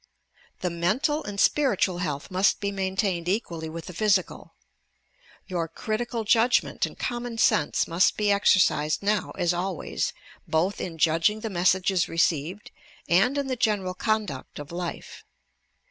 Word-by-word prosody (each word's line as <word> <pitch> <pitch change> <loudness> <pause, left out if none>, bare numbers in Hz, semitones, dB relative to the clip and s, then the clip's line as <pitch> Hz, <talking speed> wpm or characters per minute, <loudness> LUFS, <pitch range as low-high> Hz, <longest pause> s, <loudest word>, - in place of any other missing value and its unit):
The 180 - -1
mental 250 - 0
and 205 -1 -6
spiritual 200 -12 +2
health 150 -2 -4
must 185 +2 +2
be 200 0 -2
maintained 190 -2 -1
equally 170 -6 -2
with 165 0 -7
the 180 - -8
physical. 195 0 0 0.9
Your 175 -3 -2
critical 225 +7 -3
judgment 230 +3 +2
and - - -13
common 240 -1 -4
sense 155 -8 +2
must 170 +5 +2
he 210 -1 +2
exercised 185 -6 +3
now 205 -1 +1
as 175 0 +1
always, 180 -1 -2 0.4
both 175 +5 0
in 165 -3 -5
judging 165 +7 +2
the 225 - -4
messages 185 0 +2
received 165 +3 -1 0.4
and 195 +11 +3
in 280 - 0
the 260 -1 -2
general 210 -6 0
con 215 +3 0
duct 135 -7 -8
of 145 +1 -8
life. 175 0 -6
190 Hz, 145 wpm, -26 LUFS, 170-215 Hz, 0.9 s, exercised